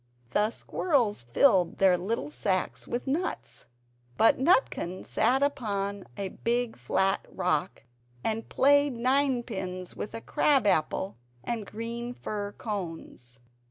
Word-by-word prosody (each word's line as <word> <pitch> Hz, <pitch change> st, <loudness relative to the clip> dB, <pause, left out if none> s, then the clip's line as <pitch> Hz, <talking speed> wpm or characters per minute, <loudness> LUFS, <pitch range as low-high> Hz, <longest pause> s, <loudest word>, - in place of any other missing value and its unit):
The 210 Hz, +7 st, +2 dB
squirrels 240 Hz, -, 0 dB
filled 180 Hz, -, +3 dB
their 190 Hz, -2 st, +5 dB
little 180 Hz, -4 st, -3 dB
sacks 185 Hz, +3 st, -1 dB
with 240 Hz, -, -3 dB
nuts. 310 Hz, +7 st, -3 dB, 0.5 s
But 225 Hz, -, +5 dB
Nutkin 265 Hz, -, +1 dB
sat 265 Hz, +2 st, +2 dB
upon 200 Hz, -8 st, -2 dB
a 195 Hz, -1 st, -3 dB
big 235 Hz, +3 st, -1 dB
flat 190 Hz, +11 st, 0 dB
rock, 180 Hz, -1 st, -1 dB, 0.4 s
and 225 Hz, 0 st, -2 dB
played 285 Hz, 0 st, +4 dB
ninepins 235 Hz, -8 st, -1 dB
with 205 Hz, -, -5 dB
a 225 Hz, -, -5 dB
crab 275 Hz, -1 st, +2 dB
apple 190 Hz, 0 st, +1 dB, 0.3 s
and 225 Hz, -4 st, -3 dB
green 235 Hz, +2 st, -5 dB
fir 205 Hz, -3 st, -4 dB
cones. 165 Hz, -, -6 dB
215 Hz, 120 wpm, -28 LUFS, 185-245 Hz, 0.5 s, their